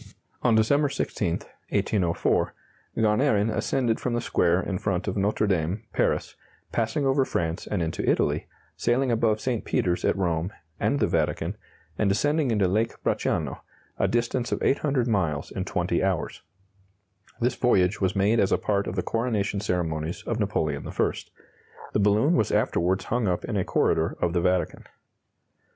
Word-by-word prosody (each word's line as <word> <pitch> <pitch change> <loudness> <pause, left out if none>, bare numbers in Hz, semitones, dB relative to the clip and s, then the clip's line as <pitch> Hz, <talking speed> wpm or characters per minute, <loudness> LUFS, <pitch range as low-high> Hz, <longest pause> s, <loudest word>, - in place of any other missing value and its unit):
On 120 -2 +3
December 140 +7 +3
16, - - -1 0.4
1804, 90 -5 +1 0.4
Garnerin 110 -1 +2
ascended 120 -4 0
from 120 -2 -1
the - - +1
square 90 -6 +2
in 95 -1 -3
front 95 -2 -1
of 95 - -1
Notre 105 +2 +1
Dame, 95 0 0
Paris; - - 0 0.4
passing 115 +5 0
over 135 0 +3
France 85 -7 -2
and 95 -5 -1
into 80 0 -3
Italy, - - +1 0.3
sailing 125 +2 +1
above 115 -2 +2
St. 120 -3 -2
Peter's 90 -1 0
at - - +2
Rome, 85 -1 0 0.3
and - - +1
the - - +3
Vatican, - - -1 0.4
and 105 - +3
descending 145 +8 +1
into 105 -4 +2
Lake 110 +5 +1
Bracciano - - -1 0.4
a - - +3
distance 120 +1 -1
of - - -1
800 135 -3 +1
miles 85 -10 0
in - - -3
20 - - 0
hours. - - -1 1.0
This 120 +2 +1
voyage 100 -6 +2
was 95 -2 +1
made 105 +4 +3
as 95 - +2
a - - +4
part 100 -1 0
of 90 - -4
the 90 - -1
coronation 110 -4 -1
ceremonies 85 -4 -2
of 115 -1 -2
Napoleon 80 -9 -1
I. - - +1 0.8
The - - +2
balloon 105 - +3
was 110 - +2
afterwards 90 +3 +1
hung 120 -2 0
up 90 -1 -1
in 115 - -3
a 95 - +1
corridor 80 -1 +1
of 85 -1 0
the 85 - +1
Vatican. 90 0 0
105 Hz, 160 wpm, -26 LUFS, 90-120 Hz, 1.0 s, a